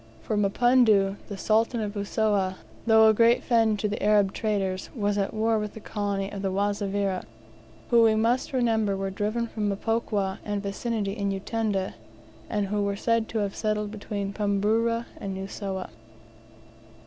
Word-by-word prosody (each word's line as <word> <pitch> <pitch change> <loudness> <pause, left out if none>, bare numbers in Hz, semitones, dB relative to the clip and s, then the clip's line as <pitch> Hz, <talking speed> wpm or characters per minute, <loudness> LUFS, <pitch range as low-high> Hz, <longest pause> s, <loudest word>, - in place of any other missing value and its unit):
For 215 - -2
Mapunda, 210 -1 +3
the 200 - -6
Sultan 225 +4 +1
of 210 -2 -3
Usowa, 200 -2 0 0.3
though 220 -1 +7
a 220 - +6
great 230 +2 +4
friend 225 -3 +3
to 210 -1 -2
Arab 205 -2 +3
traders, 195 -4 -2
was 205 -3 0
at 200 -1 0
war 220 0 +1
with 210 -1 -5
the - - -7
colony 200 -2 -3
of 200 - -5
the 195 -1 -1
Wazavira, 200 -1 -1 0.7
who 235 -1 +6
we 220 -1 +5
must 230 +4 +1
remember 225 -6 +1
were 195 0 -3
driven 215 +4 -1
from 215 -2 -2
Mpokwa 205 -2 -1
and 205 -1 -3
vicinity 205 0 -2
in 200 -2 -2
Utanda, 195 0 -2 0.6
and 210 -2 0
who 205 0 0
were 200 0 0
said 230 +2 +1
to 225 - -3
have 200 - -5
settled 210 -1 -1
between 200 -2 -4
Pumburu 220 +3 +1
and 195 -1 -5
Usowa. 190 - -5
205 Hz, 160 wpm, -26 LUFS, 200-225 Hz, 0.7 s, though